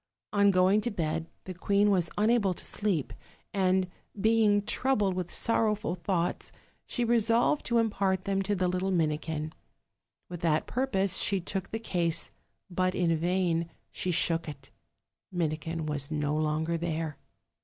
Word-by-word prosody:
On 200 -1 +5
going 190 +2 +4
to 240 - -1
bed 165 -5 -2 0.2
the 185 - -6
queen 200 +3 +2
was 180 -4 +2
unable 210 -3 +3
to - - -5
sleep, 195 -9 -1 0.4
and, 190 -1 +2 0.3
being 215 -1 +3
troubled 210 -4 +1
with 180 -1 -3
sorrowful 220 0 +1
thoughts, 175 -1 -2 0.4
she 245 - -1
resolved 230 +4 +2
to 235 - +2
impart 195 -4 +1
them 195 0 0
to 205 +1 0
the 185 -1 +1
little 185 +2 -1
Mini 155 -5 +1
kin. 155 -1 -4 0.7
With 175 -1 -7
that 160 -2 +1
purpose 200 -8 +1
she 195 -1 +2
took 190 +1 -4
the 225 - -3
case; 175 -7 -1 0.4
but 185 0 0
in 170 -2 +2
vain 170 0 0 0.2
she 185 - -3
shook 165 -2 +1
it 150 - -11 0.6
Minikin 165 -1 -2
was 145 -2 -2
no 150 -1 -1
longer 155 +2 0
there. 160 -3 -3
185 Hz, 150 wpm, -29 LUFS, 165-205 Hz, 0.7 s, On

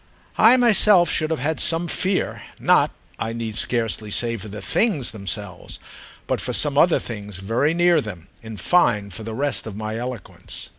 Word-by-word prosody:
I 225 +4 +7
myself 210 -6 +5
should 155 -1 +1
have 160 -5 -2
had 155 +3 0
some 165 +1 +1
fear—not, 185 +2 +1 0.3
I 115 0 -3
need 115 -1 -4
scarcely 115 -3 -2
say, 115 +3 -1
for 110 -1 -7
the 105 +1 -7
"things" 155 - +1
themselves, 100 -2 -4 0.5
but - - -1
for - - -3
some - - 0
other - - +5
things 105 -4 -6
very 115 - 0
near 175 0 +4
them; 90 -7 -8
in 110 -1 -9
fine 105 - +2
for 95 - -7
the 110 0 -6
rest 140 -2 -1
of 105 - -7
my 110 +1 -4
eloquence. 125 -4 -6
115 Hz, 170 wpm, -22 LUFS, 105-165 Hz, 0.5 s, I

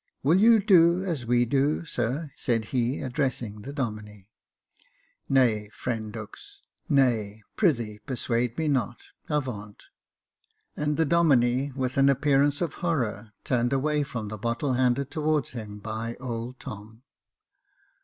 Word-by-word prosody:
" - - -51
Will 160 +7 +4
you 225 +1 +6
do 180 -3 +5
as 150 -10 -3
we 120 0 +3
do, 140 +6 +1
sir? 140 +3 -2
" - - -33
said 115 -3 +1
he, 125 +1 0
addressing 125 -5 -2
the 135 - -7
Domine. 105 -7 -5 0.6
" - - -35
Nay, 110 -5 +2
friend 110 -4 -4
Dux, 110 -1 -10 0.3
nay 110 -6 +1
— - - -53
pr'ythee 120 - +1
persuade 120 -2 -1
me 160 - 0
not 125 -4 -1
— - - -32
avaunt! 120 -9 -4 0.5
" - - -44
and 150 0 -1
the 160 - +3
Domine, 140 -4 +3
with 130 -1 -2
an 135 0 +5
appearance 140 +1 +2
of 170 -4 -1
horror, 120 - -2
turned 120 0 +1
away 150 +2 +1
from 115 -7 -4
the 110 0 -7
bottle 125 +5 -1
handed 130 +2 +1
towards 155 -3 0
him 110 -4 -7
by 110 +2 -5
old 120 0 -5
Tom. 110 +3 -10
125 Hz, 155 wpm, -26 LUFS, 115-145 Hz, 0.6 s, you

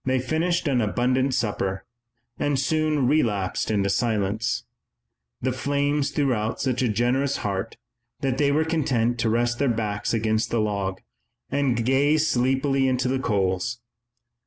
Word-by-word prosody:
They 130 0 +1
finished 160 +6 0
an 130 -4 +2
abundant 125 +6 +1
supper, 100 -5 -2 0.5
and 145 -1 +1
soon 155 0 +1
relapsed 110 -12 0
into 100 -2 +1
silence. 110 -1 0 0.8
The 130 - +1
flames 145 +2 0
threw 140 -2 +1
out 110 0 -2
such 130 -2 0
a 125 - +2
generous 125 +6 +1
heat 100 +3 -3 0.4
that 135 -2 -1
they 140 -1 +3
were 155 +2 +2
content 125 -7 0
to 115 -2 +1
rest 120 +1 0
their 140 - +2
backs 105 -3 -1
against 110 -1 0
the 115 - 0
log, 100 -3 -2 0.5
and 125 -5 +1
gaze 145 +4 +3
sleepily 135 +2 +1
into 130 -1 +1
the 130 +1 0
coals. 100 0 -1
125 Hz, 145 wpm, -24 LUFS, 110-140 Hz, 0.8 s, they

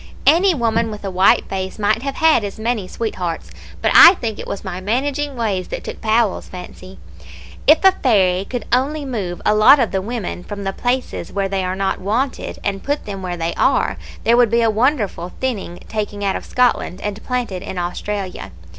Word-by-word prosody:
Any 360 +2 +5
woman 230 -3 0
with 210 -1 -7
a 195 - -3
white 185 +1 +4
face 190 -1 -4
might 215 +1 +1
have 275 0 -4
had 320 -8 +4
as 200 +1 -5
many 220 -4 -1
sweethearts; 185 -7 -4 0.3
but - - +3
I 360 - +10
think 225 -9 -4
it - - -7
was 200 - -5
my 185 -2 -5
managing 275 +7 -1
ways 205 -6 -2
that - - -6
took - - -7
Powell's 220 -2 +1
fancy. 185 +1 -10 0.7
If 310 +5 +6
a 385 - +8
fairy 195 - +2
could 245 +3 -5
only 285 +4 +1
move 200 -9 -4
a 210 - +4
lot 215 +7 +7
of 240 - +1
the 190 - -1
women 205 -4 -5
from 205 0 -7
the 195 0 -2
places 250 +4 -2
where 200 -1 -1
they 195 -1 -2
are 185 0 -2
not 195 0 -2
wanted, 235 +8 -2
and 195 -1 -2
put 290 +1 -2
them 195 -2 -6
where 180 -1 -4
they 165 0 -2
are, - - +1 0.3
there 230 - +4
would 245 -2 +5
be 235 +1 +2
a 225 - +3
wonderful 215 - 0
thinning 210 -9 -3
taken 205 -1 -4
out 195 -1 0
of - - -5
Scotland 245 -7 +1
and 205 0 -5
planted 245 -8 -3
in 190 -1 -7
Australia. 185 - -4
210 Hz, 200 wpm, -19 LUFS, 190-245 Hz, 0.7 s, I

